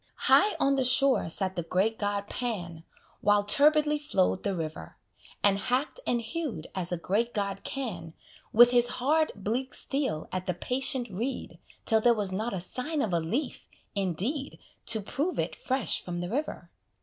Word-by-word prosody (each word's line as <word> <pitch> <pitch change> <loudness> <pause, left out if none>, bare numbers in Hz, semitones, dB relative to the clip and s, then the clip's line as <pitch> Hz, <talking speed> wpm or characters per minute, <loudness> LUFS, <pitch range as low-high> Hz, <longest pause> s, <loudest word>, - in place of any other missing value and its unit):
High 420 +1 +5
on 275 - +3
the 265 - +2
shore 255 -5 +4
sat 190 +2 0
the 175 - -1
great 190 +7 0
god 205 -1 -2
Pan, 175 -11 -4 0.4
While 205 0 +3
turbidly 300 +6 +4
flow'd 195 -11 0
the 200 -2 -2
river; 155 - -6 0.5
And 200 -1 +4
hack'd 255 - -1
and 240 - +1
hew'd 235 - -4
as 180 -2 +2
a 175 - -1
great 220 +8 -1
god 200 -2 -2
can, 180 - -5 0.4
With 240 +2 +7
his 245 -1 +4
hard, 305 +5 +2
bleak 235 +6 -3
steel 270 - -1
at 185 0 -4
the 180 - -1
patient 255 - 0
reed, 235 +9 -5 0.3
Till 220 -1 +3
there 235 +1 +4
was 205 -3 +1
not 215 +5 -2
a 190 - -3
sign 275 - -2
of 195 - -2
a 170 - +2
leaf, 205 - -3 0.3
indeed, 200 - -2 0.3
To 220 -2 +3
prove 290 - -3
it - - -2
fresh 260 -8 0
from 175 -1 -5
the 175 0 -4
river. 290 +8 -4
220 Hz, 175 wpm, -28 LUFS, 185-265 Hz, 0.5 s, With